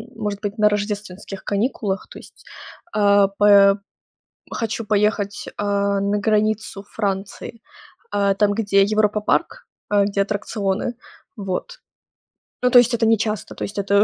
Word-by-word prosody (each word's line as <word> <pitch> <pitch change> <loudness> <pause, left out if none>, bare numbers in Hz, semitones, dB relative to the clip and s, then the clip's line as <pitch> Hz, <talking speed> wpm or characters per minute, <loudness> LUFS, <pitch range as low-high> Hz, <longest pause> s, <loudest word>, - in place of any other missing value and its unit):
может 210 -2 -4
быть, 205 +1 -4
на 210 -1 +4
рождественских 205 -2 -4
каникулах, 205 -2 -2
то - - -11
есть, - - -17 0.5
а, 200 -1 +4
п 200 0 +5 0.8
хочу 225 -1 -3
поехать, 205 -1 0
э, - - -7
на 200 0 0
границу 215 -1 0
Франции. 205 +2 -4 0.5
Э, 200 -1 +2
там, 205 0 +3
где 200 -2 +3
Европа-парк, 215 - 0 0.3
э, 205 -1 +4
где 200 0 0
аттракционы. 205 +2 -2 0.4
Вот. 200 - -4 0.9
Ну, 250 - +3
то 245 - +9
есть, 240 0 +3
это 230 -1 +1
нечасто, 220 -1 0
то - - -6
есть, 200 - -6
это 200 +1 +3
205 Hz, 135 wpm, -21 LUFS, 200-215 Hz, 0.9 s, то